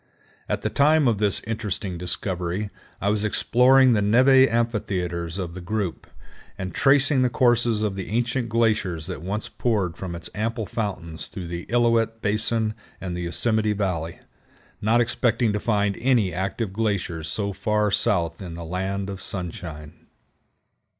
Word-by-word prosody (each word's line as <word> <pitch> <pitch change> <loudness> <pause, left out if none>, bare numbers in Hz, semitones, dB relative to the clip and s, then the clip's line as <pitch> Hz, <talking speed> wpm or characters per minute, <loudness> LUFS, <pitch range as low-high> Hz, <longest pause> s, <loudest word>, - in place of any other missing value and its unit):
At - - -1
the - - -1
time 150 0 +4
of 110 -4 +2
this 105 -2 +1
interesting 105 -4 -3
discovery 90 +2 -2 0.3
I 100 - 0
was 105 0 +1
exploring 125 +4 +4
the 105 - +2
névé 130 +5 +5
amphitheaters 95 -7 -1
of 90 -3 -4
the 95 - -7
group, 100 -1 -3 0.5
and 95 -2 -5
tracing 140 -1 +4
the 125 - +3
courses 120 -3 +2
of 105 -2 0
the 95 -1 -6
ancient 120 +2 -1
glaciers 105 -8 +1
that 90 -2 -5
once 100 +5 -3
poured 100 -8 -1
from 90 -3 -6
its 85 - -7
ample 110 +1 -2
fountains 95 -7 -4
through 90 -3 -7
the 85 0 -5
Illilouette 115 -1 +2
Basin 110 +1 0 0.3
and 90 -2 -4
the 90 - -4
Yosemite 110 +5 +1
Valley, 90 -5 -2 0.6
not 115 +3 +3
expecting 120 -1 +1
to 105 - 0
find 105 -2 +1
any 120 -8 +2
active 95 +2 -2
glaciers 95 -7 -1
so 100 +4 -2
far 105 +1 0
south 85 -5 +1
in 90 -3 -7
the 85 0 -7
land 95 +3 -2
of 95 -1 -6
sunshine. 85 -5 -6
105 Hz, 155 wpm, -24 LUFS, 90-115 Hz, 0.6 s, névé